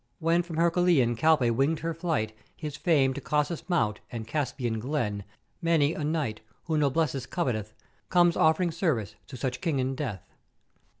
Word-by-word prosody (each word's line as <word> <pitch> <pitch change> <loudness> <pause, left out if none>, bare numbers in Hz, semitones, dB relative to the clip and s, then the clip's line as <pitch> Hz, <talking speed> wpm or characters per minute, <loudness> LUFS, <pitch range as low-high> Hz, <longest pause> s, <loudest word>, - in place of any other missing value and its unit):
When 165 +1 +2
from 175 -2 -7
Hercùlean 170 -7 +3
Calpè 135 -2 +3
winged 140 +7 +1
her 165 0 -2
flight 150 -11 -2 0.2
his 150 -3 -5
fame 145 -6 +2
to 140 - -6
Caucasus 150 +5 -1
Mount 115 -12 +1
and 115 -2 -5
Caspian 125 -4 -2
glen, 110 -6 -2 0.4
many 165 -3 +3
a 155 - -4
knight, 150 -8 -1 0.2
who 160 - -1
noblesse 145 -2 +1
coveteth, 110 - -2 0.3
comes 175 -1 +4
offering 160 +2 +3
service 140 - -1
to 130 - -8
such 125 +1 -3
King 155 -5 0
and 130 +1 -1
Death. 115 - -5
150 Hz, 160 wpm, -28 LUFS, 120-165 Hz, 0.4 s, comes